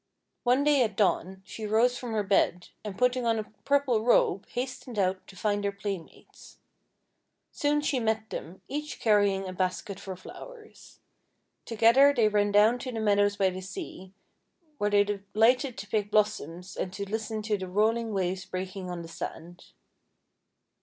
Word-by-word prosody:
One 255 +3 +3
day 290 -2 +4
at 215 -5 +1
dawn, 190 -2 0
she 215 +2 -6
rose 230 +4 +3
from 245 -2 -5
her 215 -1 +1
bed, 185 -3 +1
and 205 -3 -6
putting 250 0 +2
on 230 -1 +2
a 215 - -1 0.2
purple 275 -6 +2
robe, 205 -5 +3
hastened 250 -1 -5
out 185 -1 0
to 195 - -13
find 205 +1 -1
her 200 - 0
playmates. 200 -4 -8 0.9
Soon 295 0 +1
she 285 -3 0
met 220 -1 -1
them, 180 +4 -7
each 300 +1 -5
carry 205 -3 +4
ing 195 0 -3
a 185 - -5
basket 185 +2 -2
for 190 -1 -6
flowers. 440 - -13 0.7
Together 235 +5 +5
they 225 -4 +4
ran 205 -1 +2
down 215 +4 +5
to 255 - -5
the 225 - -4
meadows 205 -1 +2
by 190 -2 +2
the 185 +1 -6
sea, 190 0 -8 0.7
where 205 - +1
they 205 0 +5
de 205 0 -3 0.2
lighted 250 +3 +3
to 195 +2 -7
pick 205 -1 -1
blossoms 190 -4 -1
and 185 - -3
to 200 +1 -5
listen 220 +1 -3
to 215 0 0
the 190 -2 -5
rolling 220 +4 +1
waves 190 -1 -1
breaking 185 0 -5
on 175 -1 -5
the - - -9
sand. 170 +1 -8
210 Hz, 175 wpm, -28 LUFS, 190-235 Hz, 0.9 s, Together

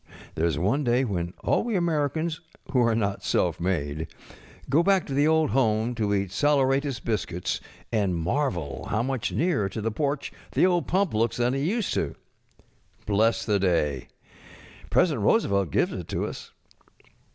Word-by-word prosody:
There 80 +2 +1
is 80 -4 -1
one 105 - +1
day 125 +1 +2
^iien 90 -5 -3
all - - +2
we 230 -2 -2
Americans 160 -1 0 0.3
who 125 - +3
are 115 -2 +3
not 100 -3 -1
self - - +1
made 80 -4 -2 0.7
eo 155 - +6
back 190 0 +3
to 140 - -5
the 145 +2 +3
old 160 -1 +3
home 115 -2 +2
to 110 -3 -1
eat 100 -2 -1
saleratus 140 +1 +2
biscuits 95 -6 -2 0.3
and 100 -5 +1
marvel 85 - -2
how 110 +2 0
much 130 -2 -2
nearer 150 - +1
to 110 - -5
the 110 +1 -1
porch 140 +4 -2 0.2
the - - +4
old 175 -2 +1
pump 190 - +1
looks 115 +2 +1
than 120 +1 +1
it 135 - -1
used 200 +9 0
to. - - -1 0.9
Bless 110 +3 +2
the 105 -2 +2
day. 75 -8 0 0.8
President 150 - +2
Roosevelt 100 -2 +2
gives - - +1
it - - -6
to - - -2
us. - - -8
115 Hz, 165 wpm, -26 LUFS, 95-145 Hz, 0.9 s, eo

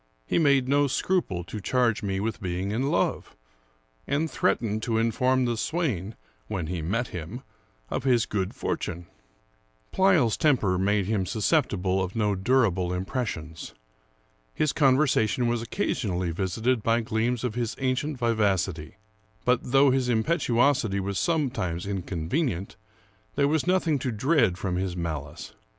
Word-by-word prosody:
He - - +1
made 140 -5 +3
no 145 +1 +3
scruple 135 - 0
to 105 +5 -7
charge 120 0 +1
me 95 -2 -2
with 115 +3 -3
being 95 +1 -2
in 130 +6 0
love; - - -1 0.7
and 150 +2 0
threatened 110 -4 0
to 115 0 -1
inform 125 +3 +2
the 120 -1 0
swain, 115 - -2 0.3
when 90 -4 -3
he 85 +1 -3
met 115 +9 -1
him, 90 - -7 0.5
of - - -2
his 125 -4 +3
good 95 -2 -3
fortune. 85 +1 -3 0.9
Pleyel's 175 - +3
temper 110 -12 +2
made 100 +1 +1
him 100 -2 -1
susceptible 95 -2 +1
of 95 +3 -5
no 105 -2 +1
durable 95 -4 +1
im 90 +1 -2
pressions. 80 - -5 0.8
His 155 - +1
conversation 130 -5 +3
was 120 -1 0
occasionally 95 - -2
visited 110 +8 0
by 115 +2 +2
gleams 115 +2 -1
of 125 -4 -1
his 120 -1 -2
ancient 135 +2 -1
vivacity; 100 -8 0 0.5
but, 125 0 +3
though 135 +2 +4
his 130 -1 +1
impetuosity 120 - +2
was 100 0 -2
sometimes 120 - -1
inconvenient, 95 - -2 0.6
there 140 0 +3
was 155 +3 0
nothing 175 -5 +2
to 130 -1 -2
dread 115 - +2
from 90 -2 -2
his 90 -1 -2
malice. 75 -4 -5
115 Hz, 140 wpm, -26 LUFS, 95-130 Hz, 0.9 s, though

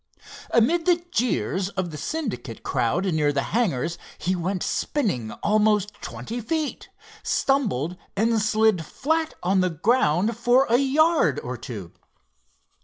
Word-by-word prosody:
Amid 325 +9 +2
the 355 - +6 0.2
jeers 205 -5 0
of 185 -3 -3
the - - -7
Syndicate 150 - -4
crowd 175 +12 0
near 150 -2 +2
the 140 -1 0
hangars 170 - 0 0.2
he 180 +4 -1
went 180 +1 -2
spinning 150 - -1
almost 210 -1 +2
twenty 240 +2 -6
feet, 310 +6 -3 0.3
stumbled 200 - 0 0.2
and 225 +2 +2
slid 215 -4 +2
flat 320 - -1
on 190 +1 +3
the 185 - +2
ground 190 - +2
for 245 +3 +4
a 240 - +6
yard 285 - +3
or 125 +1 -4
two. 105 -7 -8
210 Hz, 130 wpm, -24 LUFS, 165-245 Hz, 0.3 s, the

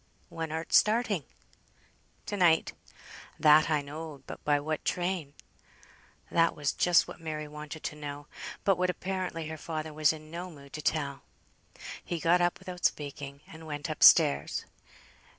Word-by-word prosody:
"When 165 -1 -5
art 160 +1 -4
starting?" 210 - +3 1.0
"To 205 - -3
night." 170 -4 +3 0.7
"That 155 +1 +6
I 150 -2 +1
knowed. 150 -1 -8
But - - -9
by 145 -1 +3
what 155 +1 -3
train?" 175 -5 -2 1.0
That 165 0 +3
was 145 -3 0
just 175 -1 +4
what - - -10
Mary 155 -2 -4
wanted 150 +1 -8
to - - -4
know; 145 -1 -7 0.4
but 195 -3 +3
what 180 0 +2
apparently 180 -3 -3
her 160 - -5
father 155 -1 -5
was 155 -1 +4
in 155 -1 -10
no 175 +2 -5
mood 140 -4 -14
to 155 - -5
tell. 140 -3 -1 0.8
He 170 - -3
got 175 +2 +3
up 175 0 +2
without 180 -2 -9
speaking, 140 -1 -2
and 160 0 -11
went 145 -2 -4
up - - -6
stairs. 70 0 +6
155 Hz, 155 wpm, -30 LUFS, 150-175 Hz, 1.0 s, That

